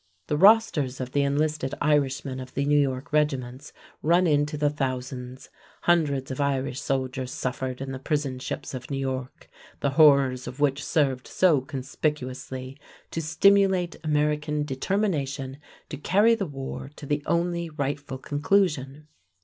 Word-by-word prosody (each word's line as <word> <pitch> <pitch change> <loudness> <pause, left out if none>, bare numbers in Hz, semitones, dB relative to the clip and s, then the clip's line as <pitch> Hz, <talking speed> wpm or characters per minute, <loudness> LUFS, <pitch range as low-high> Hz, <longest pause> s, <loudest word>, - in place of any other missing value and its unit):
The 150 - -1
rosters 180 - +4
of 130 -1 -4
the 145 - +2
enlisted 145 0 0
Irishmen 140 -2 +1
of 130 0 -9
the 140 - 0
New 145 0 +4
York 135 0 -1
regiments 135 -3 -1 0.3
run 175 +4 +3
into 150 -1 +1
the 145 0 +2
thousands. 130 -2 -4 0.3
Hundreds 145 -6 +1
of 130 - -3
Irish 135 -2 -1
soldiers 130 -1 -2
suffered 130 0 -3
in 135 0 -4
the 130 - -5
prison 135 -2 -2
ships 130 - -5
of 130 +2 -7
New 140 - -2
York, 130 -1 -4 0.3
the 140 - 0
horrors 135 -4 +5
of 130 - -8
which 145 -1 +1
served 135 -5 0
so 165 -7 +3
conspicuously 130 -1 -4 0.3
to 165 - -2
stimulate 185 +2 +3
American 150 0 0
determination 140 -3 -2 0.3
to 150 - -5
carry 205 +10 +4
the 205 -5 -1
war 135 -1 -6
to 150 - -9
the 145 +1 -1
only 170 0 0
rightful 145 -2 -3
conclusion. 145 -1 0
145 Hz, 145 wpm, -26 LUFS, 130-155 Hz, 0.3 s, horrors